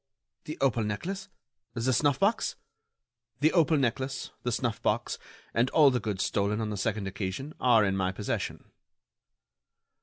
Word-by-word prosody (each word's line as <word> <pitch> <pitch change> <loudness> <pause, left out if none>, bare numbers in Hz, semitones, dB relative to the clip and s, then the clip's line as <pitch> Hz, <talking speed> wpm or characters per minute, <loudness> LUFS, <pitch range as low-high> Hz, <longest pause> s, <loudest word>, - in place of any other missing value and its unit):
"The 155 - -5
opal 120 -4 +2
necklace? 190 - -4 0.5
The 120 +2 +1
snuff 145 +1 +2
box?" 205 +4 +1 0.8
"The 155 +2 +3
opal 160 -3 +4
necklace, 130 +1 -1
the 120 - -1
snuff 115 -1 -1
box, - - 0 0.3
and 120 +3 +2
all 145 -2 +6
the 125 - +1
goods 100 -3 -2
stolen 105 +1 0
on 110 -1 -2
the - - -2
second 105 0 -1
occasion 95 +10 -4
are 115 -4 +5
in 95 -1 +1
my 95 -1 0
possession." 100 +2 -4
120 Hz, 150 wpm, -29 LUFS, 105-140 Hz, 0.8 s, all